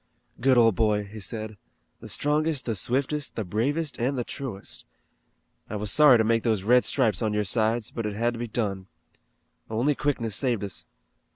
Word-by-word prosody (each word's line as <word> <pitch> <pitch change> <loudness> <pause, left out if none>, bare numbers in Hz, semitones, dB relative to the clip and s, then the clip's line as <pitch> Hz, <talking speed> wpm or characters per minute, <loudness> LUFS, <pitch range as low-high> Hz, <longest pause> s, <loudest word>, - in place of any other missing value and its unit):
"Good 130 +1 +4
old 115 -2 +6
boy," 105 +1 +1
he 105 +2 -10
said; 110 +2 -5 0.4
"the - - -10
strongest, 150 -1 0
the 115 - -1
swiftest, 130 +7 -1
the 110 - -2
bravest, 135 - -1
and 130 +3 0
the 120 - 0
truest. 120 -7 -6 0.9
I 110 - -4
was 105 -1 -3
sorry 145 -4 +7
to 110 - +3
make 115 +1 +2
those 110 -5 0
red 125 +4 +4
stripes 115 -9 +2
on 110 -1 0
your 105 - +1
sides, 110 +2 0
but 115 -2 -3
it 105 - -4
had 120 +2 0
to 115 - -7
be 120 - -3
done. 100 -4 -3 0.8
Only 120 +7 +1
quickness 125 -8 -1
saved 120 -4 0
us." 100 -3 -4
115 Hz, 185 wpm, -26 LUFS, 105-130 Hz, 0.9 s, sorry